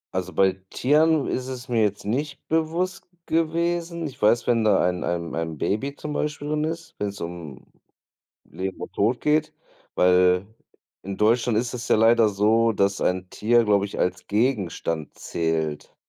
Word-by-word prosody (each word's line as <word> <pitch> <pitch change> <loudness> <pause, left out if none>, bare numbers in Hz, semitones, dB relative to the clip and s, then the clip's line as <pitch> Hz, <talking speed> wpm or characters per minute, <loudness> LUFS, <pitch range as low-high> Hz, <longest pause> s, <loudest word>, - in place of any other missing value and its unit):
Also 95 0 -2
bei 95 -1 +2
Tieren 150 +2 +3
ist 130 0 -2
es 130 -1 -7
mir 115 -2 +2
jetzt 105 -1 -1
nicht 135 +6 -3
bewusst 165 +3 -1 0.2
gewesen. 170 +1 -1
Ich 140 -7 -8
weiß, 115 +2 +3
wenn 115 -2 +2
da 105 -3 +4
ein 90 -1 -2
ein 85 -1 -3
ein 80 -1 -3
Baby 135 - -2
zum 150 0 -6
Beispiel 150 0 -3
drin 155 0 0
ist 165 +1 -5
wenn's 100 -1 -3
um 85 -6 -7 0.8
Leben 95 0 -5
und - - -7
Tod 115 +5 +1
geht 155 +1 +1 0.4
weil 90 +1 +4 0.6
in 100 0 -5
Deutschland 115 +1 +2
ist 120 +1 -2
es 120 -1 -5
ja - - +4
leider 115 0 +5
so, 110 +3 +3
dass 100 -1 +1
ein 90 0 -1
Tier, 120 +2 +2
glaube 100 -2 +2
ich, 100 - -8
als 90 - -1
Gegenstand 100 - -1
zählt. 80 -2 -3
110 Hz, 165 wpm, -24 LUFS, 95-145 Hz, 0.8 s, leider